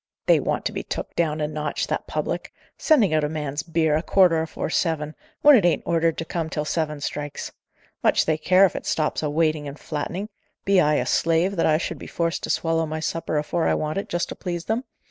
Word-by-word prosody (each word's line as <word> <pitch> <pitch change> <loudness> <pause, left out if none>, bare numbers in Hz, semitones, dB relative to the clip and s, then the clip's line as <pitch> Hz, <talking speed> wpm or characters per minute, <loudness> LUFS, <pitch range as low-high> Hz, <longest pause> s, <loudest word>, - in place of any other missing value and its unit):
"They - - +5
want - - -2
to - - 0
be - - -4
took - - -6
down 155 -2 0
a 150 - 0
notch, 150 -1 -2
that - - -3
public - - -3 0.2
sending 240 - +3
out 155 -1 +2
a 150 - 0
man's 150 -2 -3
beer 160 -1 +1
a 155 - +1
quarter 175 -2 +4
afore 160 0 -4
seven, 155 -4 0 0.3
when 295 -1 +9
it 220 - +4
ain't 175 -1 +2
ordered 165 -1 +1
to 165 - -3
come 165 -1 -3
till 150 -1 -3
seven 150 -2 -2
strikes. 145 0 -4 0.5
Much - - +3
they 155 -1 +1
care 185 +5 +5
if 185 - -1
it - - -5
stops 155 -1 0
a 150 - -1
waiting 155 -1 0
and 140 +1 -7
flattening! 170 +8 -4 0.4
Be 195 -1 +4
I 150 -1 +3
a 125 - 0
slave, 165 +7 +2
that 165 - +2
I 155 -1 +4
should 170 - -4
be - - -9
forced 170 -1 -1
to - - -9
swallow 165 -1 +1
my 155 +1 -4
supper 160 -1 -2
afore 155 +3 0
I - - +2
want 155 +4 -2
it, - - -7
just 175 0 -1
to - - -6
please 175 -3 -4
them? 230 +4 -1
160 Hz, 235 wpm, -24 LUFS, 150-175 Hz, 0.5 s, when